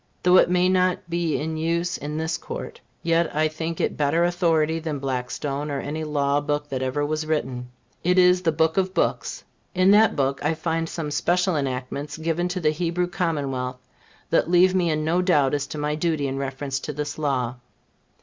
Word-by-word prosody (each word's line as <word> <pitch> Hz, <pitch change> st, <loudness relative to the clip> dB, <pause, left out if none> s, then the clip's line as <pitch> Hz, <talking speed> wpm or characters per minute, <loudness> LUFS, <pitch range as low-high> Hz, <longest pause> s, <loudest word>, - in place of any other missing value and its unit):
Though 180 Hz, +1 st, +6 dB
it -, -, +5 dB
may 180 Hz, 0 st, +3 dB
not 185 Hz, 0 st, +1 dB
be 170 Hz, -2 st, 0 dB
in 160 Hz, +1 st, -3 dB
use 170 Hz, +2 st, 0 dB
in 150 Hz, +1 st, -5 dB
this 160 Hz, +1 st, -1 dB
Court, -, -, -7 dB, 0.2 s
yet 165 Hz, -1 st, +1 dB
I 155 Hz, +1 st, +3 dB
think 160 Hz, +1 st, -4 dB
it -, -, -1 dB
better 150 Hz, +3 st, +2 dB
authority 165 Hz, -2 st, +2 dB
than 160 Hz, -2 st, -3 dB
Blackstone 135 Hz, +2 st, -3 dB
or 140 Hz, -1 st, -2 dB
any 155 Hz, +3 st, -4 dB
law 145 Hz, -1 st, +1 dB
book 145 Hz, 0 st, -2 dB
that 130 Hz, -1 st, -3 dB
ever 130 Hz, +3 st, -1 dB
was 155 Hz, +1 st, -2 dB
written. 130 Hz, -5 st, -2 dB, 0.3 s
It 180 Hz, +2 st, +2 dB
is 180 Hz, 0 st, +5 dB
the 165 Hz, -3 st, +2 dB
book 160 Hz, +2 st, +1 dB
of 190 Hz, 0 st, 0 dB
books. -, -, -1 dB, 0.3 s
In 185 Hz, +1 st, +5 dB
that 215 Hz, +1 st, +5 dB
book, 135 Hz, -1 st, 0 dB
I 155 Hz, +2 st, +1 dB
find 165 Hz, 0 st, -2 dB
some 155 Hz, -3 st, -4 dB
special 180 Hz, +3 st, +1 dB
enactments 140 Hz, +2 st, -3 dB
given 165 Hz, +2 st, -1 dB
to 180 Hz, +1 st, -3 dB
the 155 Hz, -3 st, +2 dB
Hebrew 170 Hz, +2 st, -1 dB
commonwealth, 140 Hz, -8 st, -3 dB, 0.4 s
that -, -, +2 dB
leave 180 Hz, +1 st, +5 dB
me 180 Hz, -2 st, +2 dB
in 155 Hz, -1 st, 0 dB
no 170 Hz, +3 st, +2 dB
doubt 150 Hz, -7 st, +3 dB
as 145 Hz, -1 st, -1 dB
to -, -, -7 dB
my 150 Hz, 0 st, -1 dB
duty 155 Hz, -2 st, 0 dB
in 135 Hz, 0 st, -3 dB
reference 135 Hz, 0 st, -3 dB
to 150 Hz, -, -5 dB
this 150 Hz, +1 st, -4 dB
law. 130 Hz, -5 st, -1 dB
155 Hz, 195 wpm, -24 LUFS, 145-175 Hz, 0.4 s, Though